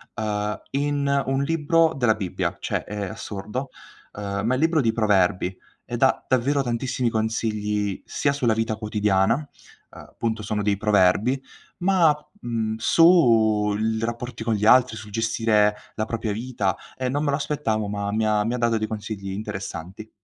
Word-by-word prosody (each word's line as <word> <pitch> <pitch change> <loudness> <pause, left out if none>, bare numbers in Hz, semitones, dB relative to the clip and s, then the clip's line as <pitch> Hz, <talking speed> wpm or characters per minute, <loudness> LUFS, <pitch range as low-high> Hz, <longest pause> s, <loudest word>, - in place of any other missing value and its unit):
uhm, 105 -1 -2
in 140 0 0
un 135 +1 +1
libro 165 +2 +2
della 120 -5 +2
Bibbia, 95 -5 -3
cioè - - -2
è 105 0 -4
assurdo, 105 +5 -5 0.4
uhm, 100 0 -4
ma 120 - +2
è - - +2
il 130 - -2
libro 165 -1 +3
di 115 -5 +2
proverbi 95 -4 +2 0.3
e - - -5
dà - - +2
davvero 135 +3 +2
tantissimi 120 0 -1
consigli 105 -2 -1
sia 140 - 0
sulla 130 -5 +1
vita 110 0 -1
quotidiana, 105 -2 +1
uhm, 150 +2 -6 0.5
appunto 110 -1 -4
sono 105 0 -2
dei 100 -1 +1
proverbi, 105 +5 +3 0.4
ma 175 -4 +4 0.2
mhmm, 115 - -2
su 110 - +4
il 110 +1 -1
rapporti 120 +1 -4
con 115 - +1
gli 105 0 -1
altri, 125 +1 +5
sul 110 -1 -10
gestire 115 -1 +2 0.2
la 110 - -1
propria 110 -1 -3
vita, 105 -4 -2 0.2
e 130 -1 -1
non 145 +3 -1
me 145 - +1
lo - - +2
aspettavo 115 -8 -1
ma 100 0 -3
mi 110 0 +1
ha 105 -1 +2
mi 115 - -1
ha - - -1
dato 115 -2 +1
dei 110 0 -2
consigli 105 -2 -5
interessanti. 100 0 -6
110 Hz, 170 wpm, -24 LUFS, 105-130 Hz, 0.5 s, altri